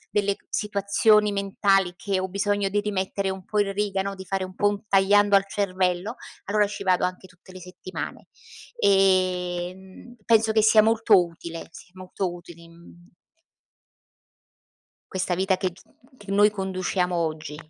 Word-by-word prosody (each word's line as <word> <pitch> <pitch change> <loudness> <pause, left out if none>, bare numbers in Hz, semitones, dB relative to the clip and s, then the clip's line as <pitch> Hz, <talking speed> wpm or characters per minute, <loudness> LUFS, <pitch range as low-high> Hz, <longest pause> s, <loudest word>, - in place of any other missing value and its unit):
delle 200 -1 +1
ch - - -34
situazioni 210 +1 +2
mentali 195 -2 +1
che 195 +1 -2
ho 190 - -4
bisogno 200 +1 0
di 205 +1 0
rimettere 200 -1 -2
un 190 0 -6
po' 210 +3 -2
in 200 -1 0
riga, 200 -1 -1
no, 200 0 -4
di 190 - -9
fare 195 0 -2
un 185 0 -12
po' 205 - +2
un 205 +1 -6
tagliando 205 +1 +4
al 195 - +5
cervello 190 +1 -1 0.3
allora 210 +1 +2
ci 200 0 -7
vado 185 -2 +2
anche 180 +1 -3
tutte 180 +1 -19
le 185 - -11
settimane. 185 +1 -8 0.5
Ehm, 185 - 0
penso 225 0 +3
che 220 - +4
sia 215 0 +6
molto 220 -2 +4
utile 170 0 -9
sì 180 - -14
molto 185 0 -4
utile 170 -1 -13
in 170 +1 -16 2.2
questa 185 -1 -1
vita 190 +1 +1
che 185 0 -2
g 180 +2 -18 0.4
che 205 -3 -9
noi 205 +1 +5
conduciamo 185 -2 -2
oggi. 155 -2 -3
195 Hz, 160 wpm, -24 LUFS, 185-205 Hz, 2.2 s, sia